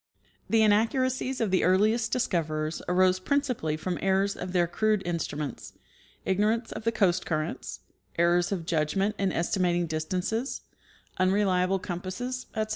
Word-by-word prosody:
The 225 Hz, -1 st, +4 dB
inaccuracies 255 Hz, +5 st, +1 dB
of 220 Hz, -4 st, 0 dB
the 185 Hz, -, +2 dB
earliest 215 Hz, +5 st, +3 dB
discoverers 155 Hz, -9 st, -1 dB
arose 185 Hz, +1 st, +3 dB
principal!}' 250 Hz, -, -1 dB
from 175 Hz, +2 st, -3 dB
errors 195 Hz, +1 st, +1 dB
of 180 Hz, 0 st, -6 dB
their 180 Hz, -2 st, +3 dB
crude 210 Hz, +3 st, 0 dB
instruments, 155 Hz, -4 st, -4 dB, 0.5 s
ignorance 215 Hz, +5 st, +1 dB
of 220 Hz, -, -7 dB
the 230 Hz, -, +3 dB
coast 185 Hz, -4 st, +2 dB
currents, 155 Hz, -2 st, -3 dB, 0.4 s
errors 175 Hz, +1 st, +3 dB
of 180 Hz, -5 st, -2 dB
judgment 170 Hz, +6 st, 0 dB
in 195 Hz, -1 st, +1 dB
estimating 175 Hz, 0 st, +1 dB
distances, 180 Hz, -, -2 dB, 0.6 s
unreliable 185 Hz, -1 st, +2 dB
compasses, 190 Hz, +9 st, -5 dB
etc. 215 Hz, 0 st, -1 dB
185 Hz, 130 wpm, -27 LUFS, 175-220 Hz, 0.6 s, The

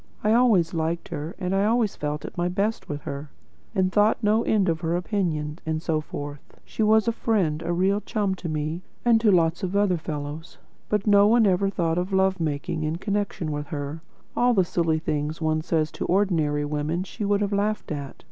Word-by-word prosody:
I 215 Hz, +1 st, +3 dB
always 220 Hz, -9 st, +4 dB
liked 165 Hz, +1 st, -2 dB
her, 155 Hz, +1 st, -5 dB
and 185 Hz, -1 st, -2 dB
always 215 Hz, +2 st, +2 dB
felt 150 Hz, 0 st, -3 dB
at -, -, -8 dB
my 175 Hz, 0 st, 0 dB
best 200 Hz, +5 st, -1 dB
with 145 Hz, -1 st, -4 dB
her, 140 Hz, +2 st, -6 dB, 0.5 s
and 185 Hz, -1 st, +2 dB
thought 210 Hz, +3 st, +4 dB
no 215 Hz, +2 st, +3 dB
end 210 Hz, -4 st, +2 dB
of 165 Hz, -1 st, +1 dB
her 165 Hz, 0 st, 0 dB
opinion, 175 Hz, -5 st, -2 dB
and 160 Hz, 0 st, -1 dB
so 155 Hz, -1 st, -1 dB
forth. 145 Hz, -1 st, -8 dB
She -, -, -5 dB
was 220 Hz, +1 st, +4 dB
a -, -, +4 dB
friend 190 Hz, -10 st, 0 dB
and 170 Hz, -, -4 dB
a -, -, +1 dB
real 195 Hz, +4 st, +2 dB
chum 205 Hz, -3 st, -1 dB
to 180 Hz, -2 st, -6 dB
me, 155 Hz, +2 st, -2 dB, 0.2 s
and 230 Hz, -2 st, +5 dB
to 220 Hz, -, +4 dB
lots 165 Hz, -2 st, +2 dB
of 190 Hz, +1 st, -2 dB
other 200 Hz, -3 st, +3 dB
fellows. 150 Hz, +1 st, -6 dB, 0.3 s
But 210 Hz, -1 st, 0 dB
one 210 Hz, +3 st, +5 dB
never 195 Hz, -1 st, +3 dB
thought 170 Hz, -3 st, 0 dB
of 180 Hz, +2 st, -3 dB
love 190 Hz, 0 st, +2 dB
making 155 Hz, +1 st, -2 dB
in 155 Hz, +1 st, -1 dB
connection 200 Hz, -4 st, -2 dB
with 145 Hz, 0 st, -4 dB
her. 145 Hz, +1 st, -5 dB, 0.3 s
All 245 Hz, 0 st, +3 dB
the 190 Hz, -3 st, +4 dB
silly 165 Hz, -2 st, +1 dB
things 150 Hz, 0 st, -2 dB
one 155 Hz, -1 st, 0 dB
says 155 Hz, -1 st, 0 dB
to -, -, -4 dB
ordinary 165 Hz, -6 st, +1 dB
women 150 Hz, +4 st, -2 dB
she 210 Hz, +3 st, -7 dB
would 205 Hz, 0 st, +1 dB
have 205 Hz, 0 st, 0 dB
laughed 210 Hz, -1 st, -1 dB
at. 140 Hz, -2 st, -5 dB
175 Hz, 205 wpm, -25 LUFS, 155-205 Hz, 0.5 s, and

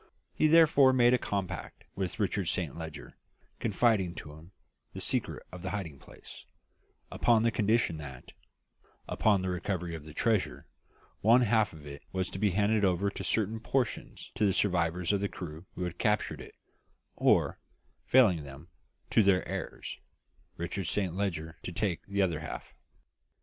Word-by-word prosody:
He 155 Hz, -, +3 dB
therefore 150 Hz, -4 st, +6 dB
made 120 Hz, -1 st, +5 dB
a 125 Hz, -, +3 dB
compact 100 Hz, -4 st, -4 dB
with 95 Hz, -3 st, -4 dB
Richard -, -, 0 dB
Saint -, -, -1 dB
Leger, 80 Hz, -2 st, -8 dB, 0.4 s
confiding 105 Hz, -5 st, +2 dB
to 75 Hz, -, -9 dB
him 80 Hz, +4 st, -14 dB, 0.4 s
the -, -, -6 dB
secret -, -, -1 dB
of 90 Hz, -, -9 dB
the 95 Hz, -, -4 dB
hiding 90 Hz, -9 st, -5 dB
place, -, -, -13 dB, 0.7 s
upon 115 Hz, -2 st, +3 dB
the 115 Hz, -, +3 dB
condition 110 Hz, -6 st, +1 dB
that, 65 Hz, -4 st, -9 dB, 0.8 s
upon 100 Hz, -4 st, +2 dB
the 95 Hz, -, -1 dB
recovery 90 Hz, -1 st, -2 dB
of 80 Hz, -2 st, -6 dB
the 75 Hz, 0 st, -12 dB
treasure, 110 Hz, -5 st, 0 dB, 0.5 s
one 115 Hz, +4 st, +5 dB
half 110 Hz, -2 st, +2 dB
of 75 Hz, -2 st, -13 dB
it 70 Hz, 0 st, -9 dB
was 95 Hz, -1 st, -2 dB
to 95 Hz, -, -6 dB
be 105 Hz, 0 st, +3 dB
handed 105 Hz, +3 st, +2 dB
over 95 Hz, +1 st, +2 dB
in -, -, -6 dB
certain 110 Hz, +1 st, 0 dB
proportions 125 Hz, +2 st, -2 dB
to -, -, -1 dB
the 100 Hz, -2 st, +4 dB
survivors 90 Hz, -1 st, +1 dB
of 100 Hz, -, +2 dB
the 100 Hz, 0 st, -1 dB
crew 85 Hz, 0 st, -8 dB
who -, -, -3 dB
had 90 Hz, -1 st, -5 dB
captured 105 Hz, -2 st, 0 dB
it, -, -, -12 dB, 0.6 s
or, -, -, +3 dB, 0.5 s
failing 110 Hz, -11 st, +5 dB
them, 70 Hz, +4 st, -11 dB, 0.4 s
to -, -, +5 dB
their 95 Hz, -3 st, +3 dB
heirs; -, -, -5 dB, 0.6 s
Richard 85 Hz, +3 st, -3 dB
Saint 95 Hz, 0 st, 0 dB
Leger 85 Hz, -4 st, -3 dB
to -, -, -6 dB
take 90 Hz, 0 st, -2 dB
the 100 Hz, 0 st, +1 dB
other 85 Hz, -5 st, 0 dB
half. -, -, -7 dB
95 Hz, 165 wpm, -30 LUFS, 85-110 Hz, 0.8 s, therefore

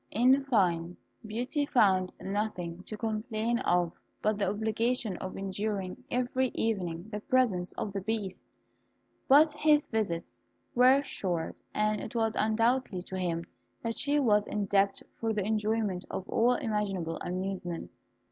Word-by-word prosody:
In 255 Hz, +5 st, +4 dB
fine, 180 Hz, -8 st, +1 dB, 0.3 s
Beauty 245 Hz, +7 st, -2 dB
found 190 Hz, -9 st, +3 dB
nothing 190 Hz, -4 st, -3 dB
to 215 Hz, -, -6 dB
complain 225 Hz, +1 st, -1 dB
of 175 Hz, -1 st, +2 dB, 0.3 s
but 215 Hz, -1 st, 0 dB
the 200 Hz, -2 st, +2 dB
obligation 220 Hz, +1 st, 0 dB
of 185 Hz, -, -6 dB
enduring 195 Hz, -1 st, -3 dB
every 255 Hz, +1 st, +1 dB
evening 180 Hz, -5 st, -1 dB
the 210 Hz, -, -3 dB
presence 210 Hz, -7 st, +1 dB
of 200 Hz, -, -4 dB
the 195 Hz, -, -2 dB
Beast; 205 Hz, -2 st, -3 dB, 0.8 s
but 300 Hz, +3 st, +7 dB
his 300 Hz, -1 st, +3 dB
visits 195 Hz, -7 st, -2 dB, 0.4 s
were 260 Hz, +3 st, +6 dB
short, 175 Hz, -10 st, -3 dB, 0.2 s
and 215 Hz, 0 st, +1 dB
it -, -, -7 dB
was 225 Hz, -1 st, +1 dB
undoubtedly 225 Hz, -2 st, +1 dB
to 190 Hz, -, -7 dB
him 170 Hz, -2 st, -1 dB, 0.4 s
that 230 Hz, -1 st, -2 dB
she 290 Hz, +1 st, +2 dB
was 210 Hz, -6 st, +3 dB
indebted 200 Hz, -1 st, +1 dB
for 225 Hz, -1 st, 0 dB
the 205 Hz, -3 st, -1 dB
enjoyment 215 Hz, -3 st, 0 dB
of 190 Hz, -, -5 dB
all 240 Hz, +2 st, +3 dB
imaginable 200 Hz, -8 st, -1 dB
amusements. 180 Hz, -1 st, -4 dB
210 Hz, 140 wpm, -30 LUFS, 185-235 Hz, 0.8 s, but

